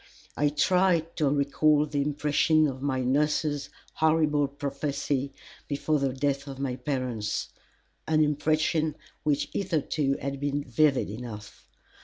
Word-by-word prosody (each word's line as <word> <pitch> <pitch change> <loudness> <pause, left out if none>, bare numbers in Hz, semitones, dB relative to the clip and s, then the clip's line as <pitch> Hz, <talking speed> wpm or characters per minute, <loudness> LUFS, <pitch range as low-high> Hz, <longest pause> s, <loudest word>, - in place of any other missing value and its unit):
I 145 0 +2
tried 170 +2 +2
to 150 -4 +2
recall 145 +1 +3
the 145 -1 -1
impression 150 +2 +2
of 130 -2 -5
my 135 -2 0
nurse's 145 +2 0 0.2
horrible 155 -2 +2
prophecy 140 0 -2 0.4
before 150 +1 0
the 135 -1 0
death 140 +1 -1
of 135 -1 -7
my 135 -2 -2
parents 125 -5 -2 0.6
an 155 -1 +4
impression 155 +1 +1 0.3
which 145 -2 0
hitherto 155 -6 0
had 140 0 -4
been 145 0 -1
vivid 140 +1 +2
enough. 105 -1 -9
145 Hz, 125 wpm, -27 LUFS, 135-155 Hz, 0.6 s, an